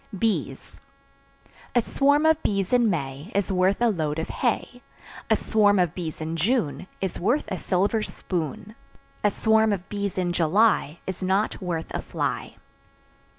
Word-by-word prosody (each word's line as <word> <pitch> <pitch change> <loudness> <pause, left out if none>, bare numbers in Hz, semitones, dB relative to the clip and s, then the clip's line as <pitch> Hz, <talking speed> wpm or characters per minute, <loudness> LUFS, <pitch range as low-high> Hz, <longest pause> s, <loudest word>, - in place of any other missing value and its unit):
Bees. 220 +2 -2 0.9
A 240 - +5
swarm 285 +6 +2
of 320 0 +4
bees 195 +1 -1
in 240 -2 +4
May 145 +1 -3
Is 200 0 +1
worth 185 +1 +2
a 240 -1 +3
load 155 -7 -1
of 160 - -3
hay; 245 0 -2 0.5
A - - +5
swarm 205 -2 +3
of 175 -4 +2
bees 165 -4 -5
in 160 +1 -3
June 185 - 0
Is 190 -2 -2
worth 240 +11 +1
a 190 - -3
silver 200 +4 +1
spoon; 180 +1 -4 0.5
A 210 - +5
swarm 220 +1 +3
of 190 -3 -3
bees 200 -2 -3
in 175 -1 0
July 175 -1 +2
Is 190 0 -5
not 190 +4 0
worth 170 -3 -3
a - - -3
fly. - - -3
195 Hz, 155 wpm, -25 LUFS, 175-220 Hz, 0.9 s, A